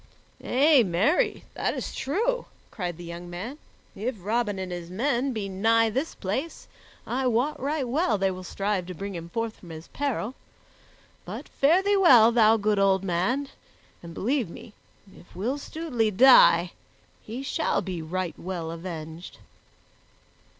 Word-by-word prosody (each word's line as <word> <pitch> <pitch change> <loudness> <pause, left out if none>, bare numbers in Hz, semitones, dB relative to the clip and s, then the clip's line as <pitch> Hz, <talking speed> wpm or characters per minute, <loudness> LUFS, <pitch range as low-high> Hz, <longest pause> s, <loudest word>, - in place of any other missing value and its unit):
"Ay, 280 +1 +5
marry, 205 - +1
that - - -1
is - - -5
true," 465 - -1 0.3
cried 175 -6 -4
the 175 - -9
young 170 +1 -8
man. 210 - -6 0.4
"If 235 +5 -3
Robin 210 +2 -1
and 185 -1 -5
his 175 -1 -6
men 255 +6 0
be 215 -5 -3
nigh 225 +4 +2
this 270 +8 -2
place, 260 - -4 0.4
I 260 +1 -1
wot 250 +6 0
right 280 0 -1
well 255 - +1
they 195 0 +1
will 185 0 -7
strive 195 0 -2
to 180 - -7
bring 200 +4 -6
him 170 -1 -7
forth 230 +3 -3
from 175 - -14
his 160 0 -10
peril. 265 -4 -2 0.9
But - - -7
fare 330 +7 +3
thee 405 0 +3
well, 245 - +7
thou 225 -1 +5
good 210 -1 +1
old 195 -1 +3
man, 195 +11 0 0.5
and 170 -1 -10
believe 245 - 0
me, 210 - -11 0.4
if 175 - -18
Will 240 +10 -2
Stutely 280 -8 -2
die, 200 -6 +6 0.5
he 240 +5 -7
shall 315 +3 0
be 180 -3 -4
right 175 +2 -3
well 170 -3 -4
avenged." 165 0 -8
215 Hz, 155 wpm, -26 LUFS, 180-265 Hz, 0.9 s, well